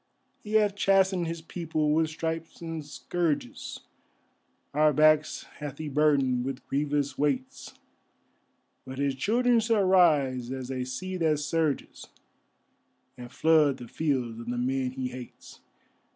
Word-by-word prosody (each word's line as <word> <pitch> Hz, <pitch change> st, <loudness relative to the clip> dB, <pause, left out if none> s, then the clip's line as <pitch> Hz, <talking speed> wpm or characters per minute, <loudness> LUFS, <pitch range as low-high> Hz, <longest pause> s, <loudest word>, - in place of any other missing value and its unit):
He 210 Hz, -, -7 dB
hath 210 Hz, -2 st, +3 dB
chastened 190 Hz, -3 st, +2 dB
His 165 Hz, 0 st, -5 dB
people 160 Hz, -3 st, -1 dB
with 160 Hz, 0 st, +2 dB
stripes 165 Hz, +1 st, -4 dB
and 165 Hz, -2 st, -5 dB
scourges, 150 Hz, -2 st, -3 dB, 0.9 s
Our 150 Hz, +1 st, +4 dB
backs 155 Hz, +1 st, +3 dB, 0.2 s
hath 145 Hz, -2 st, -6 dB
He 155 Hz, -1 st, -5 dB
burdened 135 Hz, -4 st, +2 dB
with 135 Hz, 0 st, -5 dB
grievous 145 Hz, -1 st, -1 dB
weights, 135 Hz, -3 st, -2 dB, 1.1 s
But 130 Hz, 0 st, -8 dB
His 140 Hz, 0 st, 0 dB
children 235 Hz, -, +2 dB
shall 225 Hz, -2 st, +2 dB
rise 145 Hz, -10 st, +3 dB
as 130 Hz, -1 st, -5 dB
a 130 Hz, -1 st, -3 dB
sea 185 Hz, +9 st, -5 dB
that 160 Hz, -3 st, +2 dB
surges, 150 Hz, 0 st, -2 dB, 1.1 s
And 120 Hz, 0 st, -10 dB
flood 155 Hz, -3 st, +3 dB
the 120 Hz, -, -9 dB
fields 125 Hz, -6 st, -2 dB
of 115 Hz, -, -9 dB
the 120 Hz, 0 st, -2 dB
men 130 Hz, +1 st, 0 dB
He 130 Hz, 0 st, -4 dB
hates. 125 Hz, -1 st, -11 dB
150 Hz, 135 wpm, -28 LUFS, 130-165 Hz, 1.1 s, Our